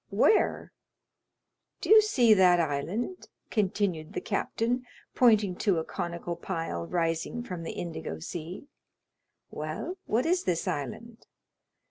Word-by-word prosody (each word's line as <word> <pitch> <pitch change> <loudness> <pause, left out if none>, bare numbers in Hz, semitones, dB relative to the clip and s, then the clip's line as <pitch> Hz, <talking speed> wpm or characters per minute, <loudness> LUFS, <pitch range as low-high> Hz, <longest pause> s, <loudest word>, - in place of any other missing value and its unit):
"Where?" 435 - +2 1.1
"Do - - -2
you 435 0 +10
see 250 - +4
that 180 -3 +5
island?" 170 - -2 0.2
continued 190 -6 0
the - - -2
captain, 230 +4 -1 0.3
pointing 215 -6 +4
to 195 -6 +2
a 160 - 0
conical 170 +1 -4
pile 165 - -4
rising 165 +7 -1
from 180 -7 -6
the 165 - -5
indigo 165 - -5
sea. 165 - -7 0.9
"Well, 370 +1 -5
what 235 +4 +1
is 360 +2 +1
this 170 -2 0
island?" 220 - -5
185 Hz, 120 wpm, -28 LUFS, 165-235 Hz, 1.1 s, you